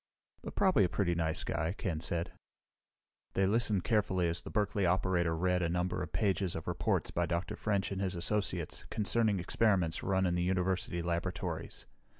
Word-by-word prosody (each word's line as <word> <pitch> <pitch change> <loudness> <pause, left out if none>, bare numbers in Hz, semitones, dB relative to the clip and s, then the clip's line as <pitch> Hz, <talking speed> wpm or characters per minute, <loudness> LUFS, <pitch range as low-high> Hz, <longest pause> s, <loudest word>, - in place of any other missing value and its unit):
"But - - -8
probably 185 - +4
a 90 - +2
pretty 90 -2 +1
nice 80 -2 -1
guy," 80 +4 -1
Ken 85 -5 -2
said. 85 +1 -3 1.0
They 95 - +2
listened 105 -2 +2
carefully 95 -5 +1
as 85 0 -2
the - - -8
Berkeley 105 -1 0
operator 85 -2 +2
read 90 +1 +1
a 85 - +1
number 90 +1 -1
of 90 - -5
pages 95 -4 0
of 80 - -6
reports - - 0
by 85 0 0
Dr. 85 +2 -2
French 100 -2 -1
and 95 0 -2
his 95 -1 -1
associates, 90 -2 -2
concerning 110 -1 +1
experiments 90 -3 +1
run 95 -1 +1
in 90 - +1
the 90 - 0
university 90 -1 0
laboratories. 85 +1 -3
90 Hz, 170 wpm, -33 LUFS, 85-100 Hz, 1.0 s, probably